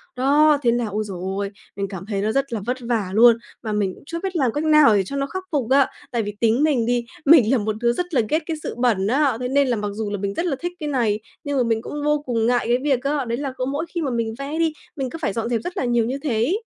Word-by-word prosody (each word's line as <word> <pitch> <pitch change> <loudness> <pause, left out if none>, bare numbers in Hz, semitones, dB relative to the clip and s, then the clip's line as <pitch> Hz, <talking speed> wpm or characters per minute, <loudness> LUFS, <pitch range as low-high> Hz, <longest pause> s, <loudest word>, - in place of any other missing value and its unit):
đó 290 +3 +4
thế 235 -2 +3
là 240 -1 0
ôi 210 +1 -2
giời 190 -3 -6 0.2
ơi, 200 -1 -2 0.3
mình 200 -1 -2
cảm 190 -1 -7
thấy 200 -2 -2
nó 215 +1 0
rất 275 -1 -1
là 220 - -1
vất 250 +1 -1
vả 230 -5 -1
luôn, 230 +2 +7 0.3
mà 220 - -3
mình 200 -3 0
cũng - - -18
chưa 335 +2 -5
biết 380 -2 -3
làm 260 -7 +2
cách 295 - -1
nào 305 -8 +6
để 195 - +3
cho 280 - -6
nó 275 - 0
khắc 375 +5 -5
phục 270 -6 -1
á. 275 -1 +5 0.2
Tại 235 -3 0
vì 205 0 -5
tính 230 +4 +3
mình 275 -7 +2
đi, 240 0 0 0.2
mình 275 -6 +7
là 265 - +4
một 215 0 -2
đứa 235 0 +3
rất 355 +5 -4
là 250 - +4
ghét 310 - +2
cái 325 -2 -3
sự - - -4
bẩn 220 -6 +2
á, 270 -1 +2
thế 250 - -2
nên 275 +1 +2
là 245 - +1
mặc 210 -1 -3
dù 215 -1 -3
là 205 - -2
mình 200 0 -3
rất 340 - -2
là 295 -6 0
thích 350 +1 -4
cái 300 -1 -3
này, 230 -6 +1 0.2
nhưng 285 -2 -2
mà 250 - +3
mình 225 -1 0
cũng 295 +4 -6
vô 295 0 +1
cùng 230 -3 0
ngại 245 -1 +2
cái 240 +1 +3
việc 270 -4 +1
á, 280 -1 0
đấy 235 0 -2
là 275 -2 -4
mỗi 290 +4 -2
khi 340 - -3
mà 275 -4 -1
mình 230 -1 -1
vẽ 290 +4 -4
đi, 325 -2 +2 0.2
mình 265 -3 -3
cứ 330 - -7
phải 205 - -1
dọn 230 0 -2
dẹp 230 -2 0
rất 355 - -6
là 255 - 0
nhiều 240 -2 +2
như 260 +3 -2
thế 270 -6 0
ấy. 320 - 0
245 Hz, 310 wpm, -22 LUFS, 225-290 Hz, 0.3 s, luôn